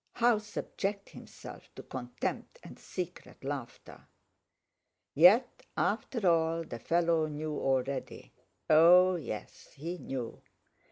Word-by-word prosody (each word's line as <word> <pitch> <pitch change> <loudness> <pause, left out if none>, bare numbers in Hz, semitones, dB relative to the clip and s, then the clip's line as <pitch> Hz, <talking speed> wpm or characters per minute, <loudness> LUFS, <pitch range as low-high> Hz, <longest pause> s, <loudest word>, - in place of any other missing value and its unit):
How 235 -2 +3
subject 200 -1 -4
himself - - -12
to - - -9
contempt - - -5
and - - -12
secret 180 -5 -7
laughter? 135 -4 -7 1.1
Yet, 180 - +5 0.2
after 230 -7 0
all, 165 0 +2
the 120 -7 -8
fellow 165 +2 +1
knew 155 0 -4
already—oh 155 +6 +2
yes, 110 -10 -8
he 170 +5 -5
knew! 125 -4 -6
165 Hz, 100 wpm, -31 LUFS, 140-180 Hz, 1.1 s, Yet